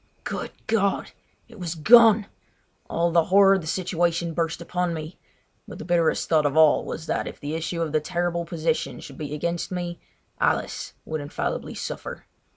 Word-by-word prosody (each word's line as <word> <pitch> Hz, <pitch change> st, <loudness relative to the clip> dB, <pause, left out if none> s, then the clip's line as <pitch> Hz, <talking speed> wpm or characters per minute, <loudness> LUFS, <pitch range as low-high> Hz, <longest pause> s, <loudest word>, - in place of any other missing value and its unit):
Good -, -, -4 dB, 0.2 s
God! 200 Hz, -3 st, 0 dB, 0.4 s
It -, -, -14 dB
was 175 Hz, -2 st, -4 dB
gone! 220 Hz, +4 st, +7 dB, 0.6 s
All 170 Hz, +1 st, +1 dB
the 165 Hz, -1 st, +4 dB
horror 195 Hz, +1 st, +6 dB
of 190 Hz, -, +1 dB
the 160 Hz, -, -8 dB
situation 170 Hz, -1 st, 0 dB
burst 165 Hz, 0 st, -1 dB
upon 175 Hz, 0 st, -2 dB
me; 155 Hz, +2 st, -7 dB, 0.5 s
but -, -, -9 dB
the -, -, -8 dB
bitterest 170 Hz, -2 st, +1 dB
thought 155 Hz, -3 st, +3 dB
of 145 Hz, +2 st, -2 dB
all 155 Hz, -2 st, +6 dB
was 160 Hz, -, -6 dB
that -, -, -1 dB
if -, -, -8 dB
the 145 Hz, +2 st, -4 dB
issue 165 Hz, +1 st, -2 dB
of 160 Hz, -, -3 dB
the 155 Hz, -, +2 dB
terrible 175 Hz, +1 st, -1 dB
position 165 Hz, -1 st, -2 dB
should 140 Hz, -, -11 dB
be 150 Hz, -1 st, -4 dB
against 170 Hz, +4 st, -2 dB
me 175 Hz, -1 st, -4 dB, 0.4 s
Alice -, -, 0 dB
would 155 Hz, -1 st, -3 dB
infallibly 145 Hz, -, -4 dB
suffer. -, -, -6 dB
170 Hz, 175 wpm, -25 LUFS, 160-180 Hz, 0.6 s, gone